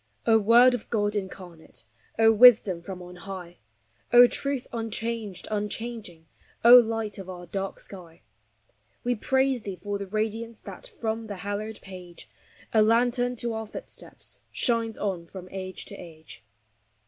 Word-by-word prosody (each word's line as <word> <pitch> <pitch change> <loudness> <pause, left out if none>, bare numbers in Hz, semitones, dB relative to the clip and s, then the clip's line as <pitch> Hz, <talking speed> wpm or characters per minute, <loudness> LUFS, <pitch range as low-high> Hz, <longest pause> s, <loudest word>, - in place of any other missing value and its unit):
O 225 0 +5
Word 235 +4 +6
of 245 - -5
God 205 -2 0
incarnate, 180 - -7 0.3
O 225 0 +6
Wisdom 220 -6 +6
from 180 +1 -8
on 180 0 -11
high, 180 -1 -8 0.5
O 245 0 +9
Truth 275 +1 -2
unchanged, 225 -3 -4
unchanging, 210 -4 -5 0.4
O 240 - +10
Light 225 -3 +3
of 190 -1 -8
our 175 -1 -8
dark 195 +2 -5
sky; 175 -4 -11 0.8
We 245 - +1
praise 265 +2 +1
thee 200 -3 -6
for 200 +3 -5
the 200 - -5
radiance 220 +2 -3
That - - -10
from 225 - -4
the 205 - -5
hallowed 210 +2 -4
page, 180 -3 -11 0.5
A 220 - +5
lantern 245 +3 +2
to 235 0 -2
our 220 0 -5
footsteps, - - -8
Shines 230 -2 -1
on 185 -5 -3
from 185 +1 -10
age 185 -1 -6
to - - -8
age. 160 -8 -12
215 Hz, 150 wpm, -26 LUFS, 185-230 Hz, 0.8 s, O